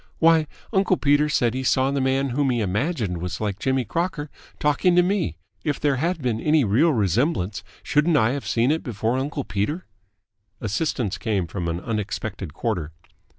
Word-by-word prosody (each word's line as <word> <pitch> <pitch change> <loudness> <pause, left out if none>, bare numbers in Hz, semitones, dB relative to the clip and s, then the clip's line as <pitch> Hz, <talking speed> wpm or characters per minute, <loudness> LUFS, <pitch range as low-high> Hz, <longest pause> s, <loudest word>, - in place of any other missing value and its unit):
Why, 165 -1 +4 0.3
uncle 190 -2 +3
Peter 145 +1 +3
said 120 -5 +2
he 130 - -2
saw 130 +1 +2
the 140 -1 0
man 135 +1 +1
whom 135 +2 +1
he 120 -2 +1
imagined 105 - -1
was 90 +1 -4
like 105 -2 -2
Jimmy 130 0 0
Crocker 165 - -2 0.3
talking 150 +5 +2
to 180 - +6
me. 180 - 0 0.3
If 145 - -1
there 145 -3 +1
had 165 +2 -1
been 115 -3 0
any 155 -1 +3
real 125 +11 +3
resemblance, 105 - 0 0.2
shouldn't 150 +2 +3
I 110 -1 +3
have 140 0 -4
seen 120 +4 +2
it 160 - 0
before 115 0 -1
uncle 140 +1 -3
Peter?" 105 - -2 0.7
Assistance 110 - -1
came 105 -6 0
from 85 +1 -4
an 85 +1 -2
unexpected 105 -3 -4
quarter. 85 -4 -3
130 Hz, 175 wpm, -24 LUFS, 105-150 Hz, 0.7 s, to